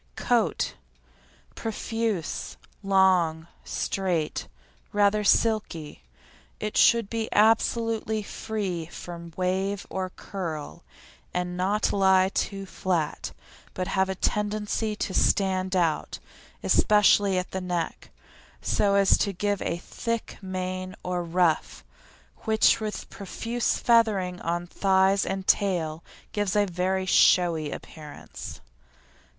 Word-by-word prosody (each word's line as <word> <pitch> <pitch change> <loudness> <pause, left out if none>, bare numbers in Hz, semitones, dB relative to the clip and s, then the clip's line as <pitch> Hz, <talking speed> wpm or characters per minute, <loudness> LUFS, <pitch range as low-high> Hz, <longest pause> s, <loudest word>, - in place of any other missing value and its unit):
COAT 240 -2 +1 0.8
Profuse, 225 -4 -3 0.2
long, 185 -5 +3 0.2
straight, 175 - -2 0.4
rather 205 +1 +3
silky. 200 - +1 0.6
It 215 0 -4
should 230 -3 +5
be 225 +1 -3
absolutely 220 0 +2
free 195 -6 -4
from 170 -1 -9
wave 190 +2 -1
or 185 -1 -2
curl, 170 -6 -6 0.5
and 180 0 -2
not 195 +4 +1
lie 190 -1 +4
too 195 0 -2
flat, 180 -5 -2 0.4
but 185 0 -3
have 190 0 +1
a 190 - -2
tendency 210 +2 -1
to 195 - -3
stand 190 -1 +2
out, 170 -4 0 0.5
especially 205 -2 +4
at 180 0 -3
the 190 - -3
neck, 175 -2 -3 0.5
so 200 -1 +1
as 200 -1 +5
to 200 - +1
give 205 +2 -1
a 170 - -1
thick 230 +6 -4
mane 185 -1 -4
or 180 -1 -2
ruff, 170 -1 0 0.5
which 220 -1 +3
with 215 -1 -4
profuse 230 +4 -2
feathering 210 -6 +2
on 175 +1 -2
thighs 190 +2 +2
and 190 0 -3
tail 170 -6 +1 0.3
gives 205 -2 -1
a 205 -1 +4
very 185 +1 -1
showy 170 -4 +4
appearance. 150 0 -9
190 Hz, 110 wpm, -26 LUFS, 180-210 Hz, 0.8 s, should